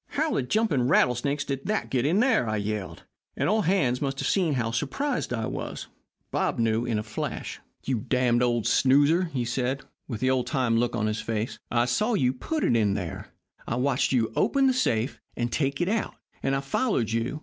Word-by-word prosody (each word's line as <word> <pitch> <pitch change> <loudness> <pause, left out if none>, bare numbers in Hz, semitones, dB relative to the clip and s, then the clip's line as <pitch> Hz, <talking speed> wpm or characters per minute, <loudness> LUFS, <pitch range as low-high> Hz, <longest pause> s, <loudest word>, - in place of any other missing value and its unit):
"'How 310 +2 -1
the - - +1
jumping 145 - +1
rattlesnakes 140 +2 +2
did 135 -1 -4
that 215 0 -1
get 130 +3 +1
there?' 230 - +3
I 110 - 0
yelled, 105 -2 -4 0.3
and - - +1
all 215 +2 +3
hands 150 -11 +1
must 135 -1 -2
have - - -1
seen 175 -7 +2
how 115 -3 -1
surprised 245 - -2
I 115 -2 -1
was. - - -5 0.4
Bob - - 0
knew 115 0 +1
in 115 -3 0
a 105 - -2
flash. 110 -1 -5 0.2
"'You 130 -3 -1
darned 125 +1 +1
old 120 -2 +1
snoozer,' 145 +7 +4
he 125 -5 -1
said, 130 +3 -1 0.2
with 115 -5 -4
the 130 +2 +2
old 130 -2 0
time 130 -6 +1
look 120 +1 +1
on 110 -2 0
his 110 +1 -1
face, 110 0 -3
'I 120 0 +2
saw 215 - +1
you 130 -7 +2
put 310 - -3
it - - +3 0.2
there. 90 -5 -5 0.4
I - - -1
watched 130 +1 +1
you 115 -4 +1
open 275 -1 +2
the 260 - +4
safe 125 - 0 0.2
and 120 0 -1
take 140 -1 -1
it 175 - +1
out, 220 +2 -1 0.3
and 135 - +1
I 135 - -1
followed 140 - 0
you. 115 +6 -1
130 Hz, 205 wpm, -26 LUFS, 115-150 Hz, 0.4 s, snoozer